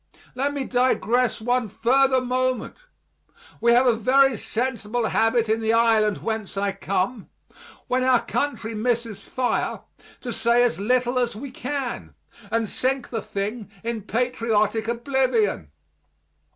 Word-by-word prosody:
Let 275 +2 -1
me 280 - -1
digress 250 -1 +1
one 245 +1 0
further 260 +5 +2
moment. 255 -1 -1 0.8
We 235 0 +4
have 245 +2 +5
a 245 -3 +4
very 265 +4 +4
sensible 235 0 -2
habit 225 0 +2
in 220 +1 +1
the 220 0 +1
island 225 -3 +3
whence 220 -3 -3
I 200 0 +1
come, 195 +3 -2 0.6
when 255 +1 0
our 255 -2 +3
country 230 -4 -2
misses 225 -2 -1
fire, 250 +4 -2 0.4
to 245 -3 -4
say 235 +1 +3
as 235 -8 +1
little 250 +3 +1
as 240 -3 -1
we 260 +5 -7
can, 250 - -5 0.3
and 225 +1 0
sink 260 +4 -1
the 225 -2 -2
thing 210 +1 -4
in 230 -1 -3
patriotic 225 -1 0
oblivion. 235 - 0
235 Hz, 135 wpm, -24 LUFS, 220-255 Hz, 0.8 s, have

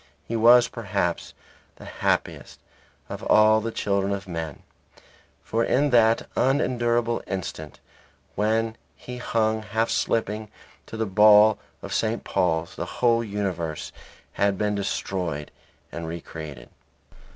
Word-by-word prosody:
He 115 - -3
was, 120 +2 +6
perhaps, 100 -7 -3 0.4
the - - -13
happiest - - -2 0.5
of - - -7
all 110 0 +5
the 115 +1 -3
children 100 -2 -1
of 95 -1 -5
men. 80 -5 -6 0.8
For 115 +1 0
in 140 +4 +2
that 115 -2 +4
unendurable 120 -3 +1
instant 80 -5 -6 0.5
when 110 +2 0 0.2
he 125 0 -9
hung, 110 -2 0
half 110 +2 -1
slipping, 110 -1 -1 0.4
to 110 - -7
the 110 - 0
ball 105 +1 +6 0.2
of - - -6
St. - - -1
Paul's, 80 +1 -1
the - - -4
whole 115 -1 +3
universe 95 -7 -3 0.4
had 100 -1 +1
been 105 +1 0
destroyed 90 -6 -3 0.4
and 85 -1 -6
re 85 +1 -5
created. 75 -7 -9
105 Hz, 125 wpm, -25 LUFS, 95-115 Hz, 0.8 s, was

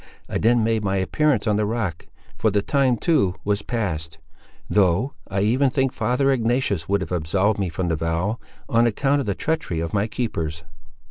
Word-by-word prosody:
I - - -2
then 115 +1 +3
made 110 -1 +1
my 100 -1 0
appearance 130 +5 +1
on 105 -1 +2
the 105 - +1
rock, 105 -7 -3 0.3
for 110 - +1
the 100 -1 0
time 135 -2 +2
too 100 - +2
was 100 0 +1
passed; 80 -10 -3 0.5
though 100 +6 +2
I 95 0 -1
even 125 +7 +3
think 135 0 0
father 135 +2 +1
Ignatius 115 -8 0
would 100 0 +2
have 90 - -5
absolved 95 +5 +1
me 95 -3 0
from 90 +2 -3
the 80 - +1
vow, 85 +8 -1 0.3
on 115 +1 +3
account 140 +5 +1
of 135 - -3
the 100 - 0
treachery 160 - -2
of 80 0 -3
my 105 +1 +1
keepers." 85 -9 -3
105 Hz, 190 wpm, -23 LUFS, 90-120 Hz, 0.5 s, then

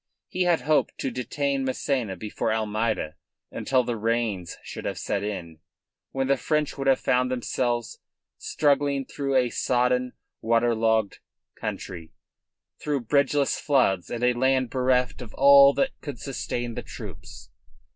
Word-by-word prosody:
He 185 0 0
had 170 -6 +3
hoped 150 +3 +1
to 135 - -2
detain 135 +3 -2
Massena 130 -5 -1
before 110 +1 -3
Almeida 110 -6 -1 0.3
until 130 -2 +1
the 120 -1 -2
rains 110 -5 -1
should - - -8
have - - -3
set 100 - -2
in, 85 -6 -5 0.5
when 135 0 -1
the 135 +1 +2
French 150 +1 -1
would 135 -1 -3
have 135 -1 +4
found 125 0 +1
themselves 120 -1 -2 0.4
struggling 140 -2 +1
through 135 0 -3
a 125 -2 +3
sodden, 125 0 +1 0.3
water 115 +1 +2
logged 110 -2 +1 0.3
country, 85 -3 -6 0.7
through 145 -3 -1
bridgeless 140 +3 +1
floods 115 - +2
and 120 0 -4
a 125 0 +4
land 130 0 +1
bereft 125 -1 +1
of 120 - -10
all 140 0 +8
that 270 -1 +1
could 145 -4 -6
sustain 120 -3 -4
the - - -4
troops. - - -10
125 Hz, 145 wpm, -25 LUFS, 115-135 Hz, 0.7 s, all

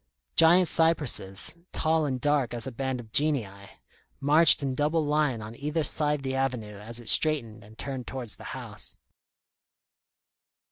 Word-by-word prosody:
Giant 175 +2 +5
cypresses, 150 - +1 0.2
tall 160 -1 0
and 130 -2 -3
dark 140 -3 0
as 120 - -4
a 135 - -5
band 130 +1 -4
of 110 -2 -12
Genii, 110 -8 -1 0.5
marched 150 +2 +7
in 135 -1 -2
double 150 +3 0
line 145 -6 0
on 110 +2 -9
either 150 +4 -2
side 150 -1 0
the 130 -1 -3
avenue 125 -6 -3
as 115 +3 -5
it 120 - -13
straightened 115 -9 +2
and 110 +2 -17
turned 135 -3 -6
towards 125 -5 -6
the - - -13
house. - - -6
135 Hz, 150 wpm, -27 LUFS, 115-150 Hz, 0.5 s, marched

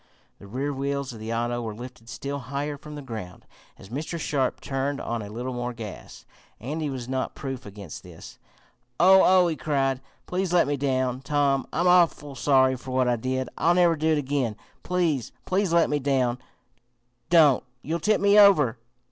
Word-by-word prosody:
The 100 - -12
rear 135 +7 -3
wheels 140 -1 -3
of 115 - -10
the 110 +1 -5
auto 120 +1 -1
were 110 -2 -5
lifted 120 -1 -10
still 140 +3 -5
higher 140 +3 -4
from 150 +1 -10
the 145 - -7
ground, 110 -8 -8 0.3
as 95 - -14
Mr. 155 +7 -4
Sharp 135 -4 -1
turned 135 +1 -2
on 115 -1 -3
a 100 - -7
little 120 +4 -5
more 120 0 -3
gas. 110 -5 -9 0.3
Andy 150 +6 -3
was 130 -3 -5
not 130 0 -3
proof 135 -3 -6
against 100 -5 -9
this. - - -13 0.6
"Oh! 190 +3 +7
oh!" 185 -1 +5
he 165 - -1
cried. 135 -2 0 0.2
"Please 185 0 -2
let 175 -1 +4
me 145 +1 0
down, 130 -2 -1
Tom. 140 -1 +1
I'm 175 +3 +1
awful 170 -5 +3
sorry 130 -1 +3
for 130 +1 -10
what 130 0 +1
I 120 - +3
did! 130 +2 -2
I'll 170 +1 +3
never 175 -2 +4
do 155 +1 -1
it - - +2
again! 135 -5 -1 0.3
Please, 170 -9 0
please 190 -1 0
let 170 -1 +4
me 150 - 0
down! 130 -3 0 0.9
Don't! 155 -6 +5 0.2
You'll 165 +4 -2
tip 215 +6 +2
me 200 +1 +5
over!" 150 - +5
135 Hz, 185 wpm, -25 LUFS, 125-155 Hz, 0.9 s, Oh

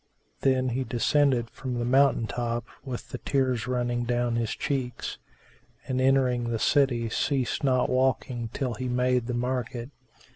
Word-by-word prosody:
Then 130 -1 +2
he 130 +2 -1
descended 125 -1 +2
from 130 -2 -5
the 120 - -1
mountain 135 -1 +4
top 120 +2 -2 0.2
with 130 -4 -6
the - - -6
tears 130 -4 0
running 120 -1 0
down 120 0 0
his 115 -1 0
cheeks; 125 -4 -3 0.7
and, 130 0 0
entering 130 -3 +2
the 115 - 0
city, 120 -2 +2
ceased 130 +3 -1
not 130 -2 +3
walking 130 -2 0
till 125 -2 -2
he 130 +2 -4
made 125 -1 +1
the 125 - -2
market. 125 0 -2
125 Hz, 150 wpm, -27 LUFS, 120-130 Hz, 0.7 s, mountain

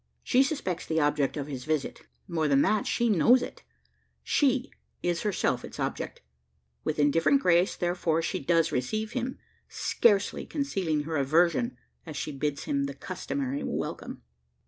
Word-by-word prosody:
She 255 - +4
suspects 270 - -1
the 160 0 +1
object 145 -1 +1
of 140 - -2
his 135 -3 -6
visit; 155 -2 -2 0.3
more 165 -4 0
than 140 -1 +4
that, 215 -1 +1
she 235 - +1
knows 230 +5 +5
it: - - -8 0.6
she 270 -2 +2 0.3
is 175 -1 0
herself 210 -3 0
its - - -9
object. - - -3 0.6
With 155 - -1
indifferent 165 - +4
grace, 180 -4 +3
therefore, 175 -2 0
does 165 +1 +1
she - - -9
receive 215 - -1
him: 255 0 -3 0.3
scarcely 205 -4 +2
concealing 190 - -1
her 160 +1 -2
aversion 170 - +2 0.3
as 155 -3 -7
she - - -3
bids 140 0 -2
him 140 -1 0
the 140 0 -5
customary 140 -4 -3
welcome. - - -4
165 Hz, 150 wpm, -28 LUFS, 145-215 Hz, 0.6 s, knows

